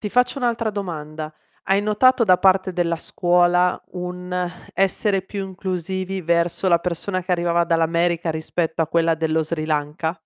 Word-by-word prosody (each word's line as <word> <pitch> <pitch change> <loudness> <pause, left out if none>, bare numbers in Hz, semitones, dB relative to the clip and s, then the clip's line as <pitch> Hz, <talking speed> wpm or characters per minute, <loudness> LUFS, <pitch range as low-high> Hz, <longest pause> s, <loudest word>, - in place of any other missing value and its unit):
ti 210 - -3
faccio 250 +5 +1
un'altra 230 -3 0
domanda: 155 -6 -5 0.3
hai 195 +1 +2
notato 230 +4 +3
da 185 -3 +5
parte 190 0 +3
della 170 -1 0
scuola 175 +2 +2
un 180 0 -5 0.4
essere 195 0 +1
più 195 0 -5
inclusivi 190 0 -4
verso 170 +2 0
la 170 -2 +4
persona 180 +2 -2
che 185 - -7
arrivava 170 -1 +2
dall'America 170 0 +1
rispetto 160 +1 -2
a 160 - -3
quella 165 0 +2
dello 160 0 0
Sri 155 0 -3
Lanka? 155 +2 -2
175 Hz, 150 wpm, -22 LUFS, 165-190 Hz, 0.4 s, da